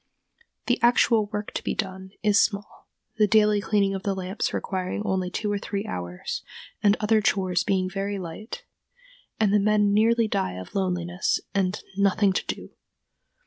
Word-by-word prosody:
The 245 - +1
actual 235 -2 +4
work 210 0 -4
to - - -4
be - - -2
done 190 -2 -4
is 210 -1 +5
small, 205 -1 -2 0.3
the 210 -1 +4
daily 210 -1 +4
cleaning 200 -2 +1
of 195 - -3
the 195 0 -1
lamps 190 +2 -2
requiring 185 +1 -3
only 190 -3 0
two 205 +3 -2
or 205 - -1
three 200 0 -4
hours, 90 0 -5 0.4
and 205 0 +4
other 215 0 +3
chores 185 -4 +1
being 185 -1 +1
very 195 +2 -3
light, 215 - -7 0.7
and 210 -2 +3
the 210 - +5
men 205 0 +3
nearly 225 +2 +3
die 95 - -1
of 95 0 -9
loneliness 180 -2 0
and 190 0 0
"nothing 200 0 +3
to - - -1
do." - - -5
200 Hz, 165 wpm, -25 LUFS, 185-210 Hz, 0.7 s, is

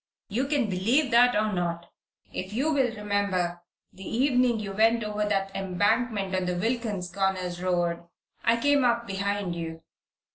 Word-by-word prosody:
You 245 +7 -1
can 280 -5 +1
believe 230 +9 +1
that, 245 +1 +5
or 215 0 +1
not. 170 -1 -3 0.4
If 185 +2 -5
you 285 +7 +1
will 265 -4 +2
remember, 200 -4 -1 0.3
the 190 - -11
evening 245 +1 +2
you 205 -2 -5
went 225 +3 +3
over 210 0 -2
that 195 -1 -1
embankment 195 +2 0
on 185 -1 0
the 180 0 -1
Wilkins 210 -4 -2
Corners 185 -2 -1
road, 175 -2 -1 0.4
I 230 0 +3
came 285 +1 +3
up 235 -1 +2
behind 200 -2 -2
you. 165 -1 -6
205 Hz, 155 wpm, -27 LUFS, 185-235 Hz, 0.4 s, that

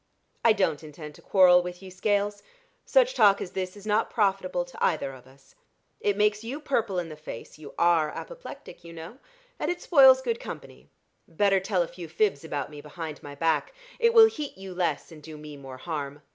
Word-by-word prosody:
"I 230 - +6
don't 165 -7 0
intend 150 0 -10
to - - -17
quarrel 180 -2 +6
with 180 +1 -8
you, 190 - -10
Scales. 205 +2 0 0.5
Such - - +4
talk 200 - +5
as 180 - -5
this 185 +1 -4
is 205 - -13
not 215 +1 +1
profitable 190 -4 0
to 175 - -7
either 140 -4 0
of 130 -1 -14
us. 135 0 -21 0.5
It 205 -1 0
makes 210 +1 +2
you 255 +6 -5
purple 230 -10 -1
in 175 -2 -2
the 155 - -8
face 150 -2 -10
you 150 -2 -11
are 170 -3 +3
apoplectic, - - -10
you 170 0 -11
know 165 +10 -10 0.4
and - - -1
it 355 0 -2
spoils 265 -6 +6
good 465 - -1
company. - - -10 0.4
Better 195 +3 +2
tell 190 -2 0
a - - -6
few 175 -1 -9
fibs 165 -2 0
about 145 -3 -4
me 145 -1 -9
behind 155 +1 -7
my 145 0 -9
back 165 - 0 0.2
it 465 0 +3
will 450 -1 +10
heat 300 - -4
you 190 -1 -8
less, 170 -5 -2
and 155 -2 -12
do 155 0 -10
me 150 -1 -10
more 135 -2 -10
harm. 145 -1 -5
180 Hz, 205 wpm, -27 LUFS, 155-210 Hz, 0.5 s, will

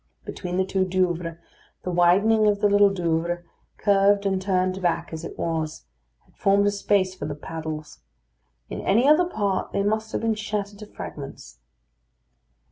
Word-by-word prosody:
Between 180 -1 -4
the 190 - +2
two 190 0 0
Douvres, 175 -3 -1 0.5
the 180 - -3
widening 200 +6 +4
of 205 -1 +2
the 210 - +4
Little 205 0 +5
Douvre, 175 -2 -1 0.3
curved 200 0 +3
and 190 -1 +1
turned 185 0 0
back 170 -1 -1
as 160 0 -6
it - - -8
was, 160 - -3 0.4
had - - -30
formed 200 +1 +3
a 205 - +3
space 200 -2 +1
for 185 -6 -6
the 145 - -4
paddles. 155 0 -7 0.7
In - - -5
any 230 +7 +3
other 305 +4 +6
part 205 - -2
they 200 - +1
must 220 +1 -1
have - - -2
been 225 -1 +1
shattered 210 -1 -4
to 210 - -9
fragments. 140 - -9
190 Hz, 165 wpm, -24 LUFS, 170-205 Hz, 0.7 s, other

